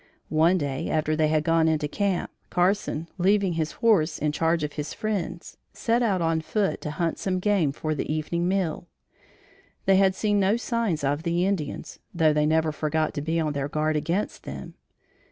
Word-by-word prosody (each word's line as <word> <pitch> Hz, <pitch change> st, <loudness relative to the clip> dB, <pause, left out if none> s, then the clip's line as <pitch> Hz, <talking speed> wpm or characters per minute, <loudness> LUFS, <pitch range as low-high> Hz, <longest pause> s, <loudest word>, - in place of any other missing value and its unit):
One 165 Hz, +4 st, +4 dB
day, 140 Hz, -4 st, -2 dB
after 155 Hz, 0 st, +1 dB
they 155 Hz, 0 st, +2 dB
had 155 Hz, 0 st, +1 dB
gone 165 Hz, 0 st, +3 dB
into 155 Hz, -2 st, +1 dB
camp, 195 Hz, +3 st, -1 dB, 0.2 s
Carson, 180 Hz, -3 st, 0 dB
leaving 195 Hz, 0 st, +3 dB
his 160 Hz, -1 st, -2 dB
horse 190 Hz, -9 st, +2 dB
in 150 Hz, 0 st, 0 dB
charge 165 Hz, +1 st, +1 dB
of 150 Hz, -, -3 dB
his 150 Hz, 0 st, -5 dB
friends, 190 Hz, -5 st, -4 dB, 0.2 s
set 235 Hz, +1 st, +1 dB
out 195 Hz, -7 st, +1 dB
on 165 Hz, -1 st, +1 dB
foot 200 Hz, +4 st, -1 dB
to 150 Hz, -, -4 dB
hunt 165 Hz, +2 st, -2 dB
some 185 Hz, -1 st, -1 dB
game 185 Hz, -6 st, +2 dB
for 155 Hz, +2 st, -3 dB
their 150 Hz, -, -3 dB
evening 155 Hz, +3 st, -1 dB
meal. 180 Hz, -3 st, -1 dB, 1.0 s
They 195 Hz, -1 st, +5 dB
had 190 Hz, -1 st, +4 dB
seen 205 Hz, 0 st, +1 dB
no 200 Hz, +3 st, +3 dB
signs 230 Hz, -, -1 dB
of 145 Hz, +4 st, -1 dB
Indians, 175 Hz, -2 st, -1 dB, 0.2 s
though 160 Hz, -3 st, +4 dB
they 150 Hz, 0 st, +2 dB
never 160 Hz, 0 st, +2 dB
forgot 155 Hz, +1 st, -1 dB
to 145 Hz, -, -3 dB
be 160 Hz, +3 st, -1 dB
on 155 Hz, -2 st, 0 dB
their 140 Hz, 0 st, -2 dB
guard 155 Hz, +1 st, 0 dB
against 170 Hz, +7 st, -1 dB
them. -, -, -8 dB
165 Hz, 185 wpm, -26 LUFS, 155-190 Hz, 1.0 s, They